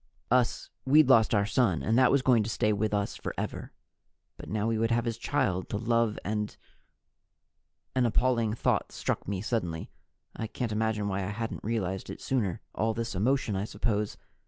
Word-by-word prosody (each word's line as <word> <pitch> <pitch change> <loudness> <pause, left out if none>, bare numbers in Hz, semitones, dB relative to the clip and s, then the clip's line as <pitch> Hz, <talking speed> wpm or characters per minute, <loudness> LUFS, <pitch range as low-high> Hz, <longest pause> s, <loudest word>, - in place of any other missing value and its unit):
Us, 125 -2 +1
we'd 145 +1 +5
lost 115 -3 +5
our 100 -1 +3
son, 100 - +1
and 110 - +1
that 130 - +6
was 140 -2 +3
going 125 -4 +5
to 105 - -2
stay 105 +1 +1
with 105 +1 0
us 100 -1 -1
forever. - - -5 0.6
But - - -10
now 105 0 -1
we 115 -1 0
would 115 0 +2
have 115 0 +1
his 115 -1 -1
child 115 -9 0
to 105 - -2
love 115 0 +1
and 105 0 -2 1.4
An 125 -2 +3
appalling 115 -1 +1
thought - - 0
struck - - -3
me 95 -1 -2
suddenly. 85 -9 -2 0.4
I 110 - -3
can't 115 +1 -3
imagine 110 -1 0
why 95 -1 -1
I 95 - -2
hadn't 110 +2 -4
realized 95 -4 -2
it - - -7
sooner. 115 -6 -1
All 110 0 0
this 115 -1 -3
emotion, 110 +2 +1
I 95 +2 -1
suppose. 105 -1 -1
110 Hz, 180 wpm, -29 LUFS, 105-115 Hz, 1.4 s, that